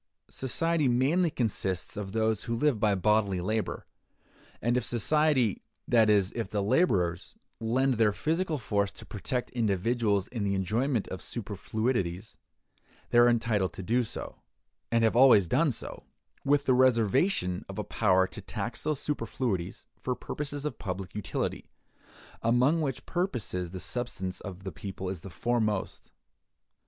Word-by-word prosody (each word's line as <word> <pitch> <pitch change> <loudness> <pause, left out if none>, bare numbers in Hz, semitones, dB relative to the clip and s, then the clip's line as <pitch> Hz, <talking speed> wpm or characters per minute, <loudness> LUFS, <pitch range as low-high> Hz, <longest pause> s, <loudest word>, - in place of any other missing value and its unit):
Society 160 +3 0
mainly 140 +9 +3
consists 105 - -2
of 100 -2 -5
those 110 -1 0
who 115 -1 -1
live 140 -2 +2
by 105 -1 +3
bodily 100 -1 +2
labor; 110 +4 -2 0.7
and 120 +2 +1
if 125 - +1
society, 130 -1 +2 0.3
that 115 -3 +4
is, 100 -2 +3
if 115 - -3
the 105 -1 -1
laborers, 95 - +1 0.2
lend 125 +2 +1
their 110 -2 +5
physical 160 - -1
force 100 -5 0
to - - -10
protect 125 +4 -3
individuals 105 -2 +1
in 115 -4 -3
the 100 -1 0
enjoyment 110 +5 0
of 95 - -6
superfluities, 105 -2 -3 0.8
they 120 - +5
are 120 0 +7
entitled 110 -5 +1
to 95 - -7
do 120 +6 +2
so, 115 - -7 0.5
and 115 0 +3
have 110 0 +3
always 120 -7 +7
done 145 - +3
so, - - -6 0.4
with 145 0 +2
the 130 - +4
reservation 125 - +2
of - - -7
a - - -1
power 95 0 +3
to - - -8
tax - - -4
those 155 -2 -1
superfluities 115 - -3
for 125 - -2
purposes 145 +1 -5
of 150 - -4
public 95 -2 -5
utility; 95 -6 -3 0.7
among 125 +8 +3
which 135 -4 -3
purposes 120 - -2
the 95 +1 -7
subsistence 95 -2 -4
of 95 -2 -8
the 95 - -4
people 95 +2 -6
is 95 -3 -5
the 95 - -8
foremost. 110 +1 -1
115 Hz, 150 wpm, -29 LUFS, 100-130 Hz, 0.8 s, are